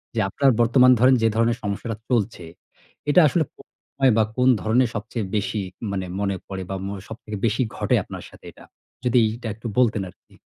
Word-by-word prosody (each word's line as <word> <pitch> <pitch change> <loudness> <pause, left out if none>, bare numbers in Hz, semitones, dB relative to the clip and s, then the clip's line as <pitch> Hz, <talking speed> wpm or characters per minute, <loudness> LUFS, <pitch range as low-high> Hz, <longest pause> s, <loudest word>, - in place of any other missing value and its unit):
যে - - 0
আপনার 135 +7 +2
বর্তমান 125 +2 +5
ধরেন 130 +1 +6
যে 115 - +4
ধরনের 115 +1 +2
সমস্যাটা 105 +2 -3
চলছে। 110 -6 0 0.7
এটা 175 +5 +6
আসলে 160 +3 +1
কো - - -15 0.4
অয় 130 -2 +6
বা 110 - +5
কোন 125 +1 +4
ধরনের 115 +2 +2
সবচেয়ে 110 0 -4
বেশি, 100 0 -1 0.3
মানে 95 -1 -2
মনে 100 -1 0
পড়ে 95 -1 -5
বা 95 - -3
মো 100 - -4
সব 110 - -8
থেকে 105 -1 -6
বেশি 115 +3 +1
ঘটে - - +1
আপনার - - -9
সাথে - - -17
এটা? - - -17 0.4
যদি 125 0 +4 0.2
এটা 120 - -7
একটু 115 +1 -7
বলতেন 110 -5 +3
আরকি? - - -22
115 Hz, 195 wpm, -23 LUFS, 100-125 Hz, 0.7 s, ধরেন